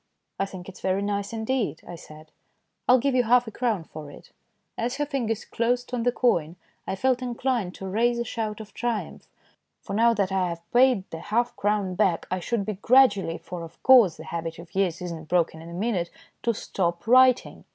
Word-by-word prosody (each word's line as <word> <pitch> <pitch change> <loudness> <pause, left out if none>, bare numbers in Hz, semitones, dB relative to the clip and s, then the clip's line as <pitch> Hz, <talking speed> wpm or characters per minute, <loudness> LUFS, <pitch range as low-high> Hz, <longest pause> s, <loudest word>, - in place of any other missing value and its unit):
"I 195 - 0
think 185 -2 -10
it's 190 - -11
very 190 +1 0
nice 200 0 -2
indeed," 225 -4 -2
I - - -7
said; 155 -1 -13 0.3
" - - -51
I'll 250 - +8
give 275 +2 0
you 255 - +4
half 245 +2 +4
a 220 - -7
crown 225 -7 -1
for 155 -2 -10
it." - - -14 0.4
As 240 +3 -2
her 295 +1 -1
fingers 240 -7 -2
closed 245 +2 -1
on 245 - 0
the 245 +1 +2
coin 175 -11 +1 0.3
I - - -1
felt 255 +4 +1
inclined 240 -6 -2
to 195 - -7
raise 235 +5 +1
a 235 - -1
shout 220 -2 -4
of 215 -1 -10
triumph. 240 -3 -3 0.5
For - - -8
now 230 +2 +4
that 200 -2 0
I 185 -2 +1
had 170 -1 -6
paid 245 -5 +4
the 165 - -6
half 230 +7 -1
crown 205 -2 0
back 185 -3 +1
I 185 - 0
should 200 +2 -2
be 215 - -2
able 200 -1 -9
gradually 215 -10 +4
for, 180 -1 -8
of 165 -1 -11
course, 245 -9 +6
the 160 - -9
habit 165 0 -5
of 170 0 -12
years 185 -3 0
is 175 - -4
not 160 -2 -8
broken 165 -1 +1
in 165 - -10
a - - -9
minute 185 -2 -1 0.3
to 235 - +1
stop 170 -4 -2
writing. 255 +1 +4
205 Hz, 215 wpm, -25 LUFS, 175-240 Hz, 0.5 s, I'll